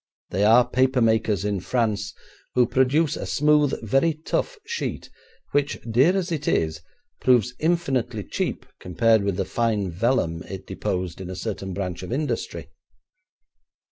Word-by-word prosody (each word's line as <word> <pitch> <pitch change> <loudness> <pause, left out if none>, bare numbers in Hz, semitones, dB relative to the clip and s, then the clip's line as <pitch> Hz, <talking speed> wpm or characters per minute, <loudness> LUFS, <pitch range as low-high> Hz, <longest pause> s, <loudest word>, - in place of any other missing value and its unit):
They 95 +3 +1
are 115 +3 +6
paper 130 +1 +2
makers 110 -3 +2
in 100 -2 0
France, 105 -1 -1 0.4
who 125 -1 +5
produce 135 +5 +2
a - - -5
smooth, 150 -1 +3
very 140 +8 +2
tough 325 - -2
sheet, 470 +1 -4 0.4
which, 145 0 +1
dear 135 +12 +4
as 185 -2 -2
it 150 -3 -3
is, 80 -1 0 0.4
proves 125 -2 +3
infinitely 160 -7 0
cheap - - -3
compared 110 +4 +2
with 100 -2 0
the 95 - 0
fine 105 -4 0
vellum 85 -4 0
it 95 -1 -7
deposed 90 -1 -3
in 90 - -6
a 95 - -5
certain 95 -2 -4
branch 90 -3 -4
of 90 - -7
industry. 145 +4 -3
115 Hz, 145 wpm, -24 LUFS, 95-140 Hz, 0.4 s, are